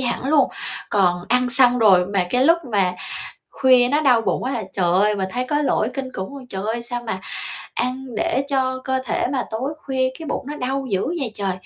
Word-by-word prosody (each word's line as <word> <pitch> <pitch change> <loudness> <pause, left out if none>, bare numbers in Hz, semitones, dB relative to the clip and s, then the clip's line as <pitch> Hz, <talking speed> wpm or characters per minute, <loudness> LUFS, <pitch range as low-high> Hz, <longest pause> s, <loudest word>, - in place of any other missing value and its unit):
hẳn 245 -1 -2
luôn, 300 -2 +4 0.4
còn 180 -3 +2
ăn 250 +1 +2
xong 250 -1 +5
rồi 185 -5 +5
mà 195 -2 0
cái 250 +1 +3
lúc 335 +3 +5
mà 190 -3 +2 0.6
khuya 255 -2 +4
nó 290 +3 +2
đau 255 -6 +4
bụng 225 - -1
quá 255 - -2
là 235 -4 -2
trời 175 -3 +1
ơi, 205 +3 +3
mình 190 -1 -2
thấy 250 +1 -1
có 295 0 +1
lỗi 230 -5 +1
kinh 260 -2 -4
khủng 190 +9 -6
luôn, 265 -2 -10
trời 190 -3 -5
ơi, 230 +2 -2
sao 240 0 -4
mà 190 -3 -3 0.5
ăn 260 +2 -2
để 265 - +1
cho 260 -2 0
cơ 260 0 0
thể - - 0
mà 260 -3 0
tối 250 +6 -2
khuya 260 -1 +1
cái 325 - -7
bụng 275 - -3
nó 295 +1 -5
đau 270 +1 -2
dữ 190 +4 0
vậy 295 -7 -2
trời. 195 -2 -1
250 Hz, 225 wpm, -21 LUFS, 205-265 Hz, 0.6 s, xong